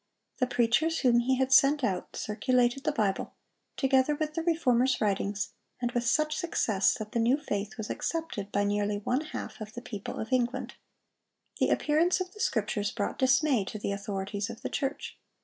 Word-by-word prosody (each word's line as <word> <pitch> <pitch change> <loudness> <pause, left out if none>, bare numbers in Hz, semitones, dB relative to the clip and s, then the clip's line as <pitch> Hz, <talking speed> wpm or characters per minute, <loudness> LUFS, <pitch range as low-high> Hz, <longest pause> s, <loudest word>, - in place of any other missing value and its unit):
The 255 - +2
preachers 250 +8 +2
whom 240 -3 +4
he 255 +2 +2
had 265 +1 +1
sent 280 +1 +5
out 185 -6 -2
circulated 245 +4 +1
the 305 - +3
Bible, 210 -8 -1 0.4
together 270 +1 +3
with 305 0 -2
the 330 - -1
Reformer's 265 -7 +2
writings, 200 0 0 0.3
and 240 -1 -1
with 240 -1 -1
such 305 +4 +2
success 225 - +1
that 215 -3 -7
the 235 - 0
new 240 +4 +3
faith 210 -8 -4
was 220 -2 -4
accepted 320 -12 -3
by 205 - +1
nearly 205 0 0
one 245 +7 0
half 305 - -7
of 215 0 -7
the 240 - -7
people 205 -5 -6
of 220 +4 -4
England. 255 +1 0 0.9
The - - +3
appearance 325 +5 +2
of 370 0 -4
the 420 - -14
Scriptures 210 - 0
brought 205 -3 -3
dismay 260 -2 +3
to 215 - -6
the 205 - -3
authorities 200 +1 -3
of 230 - -9
the - - -2
church. 275 +1 -3
240 Hz, 185 wpm, -29 LUFS, 210-280 Hz, 0.9 s, sent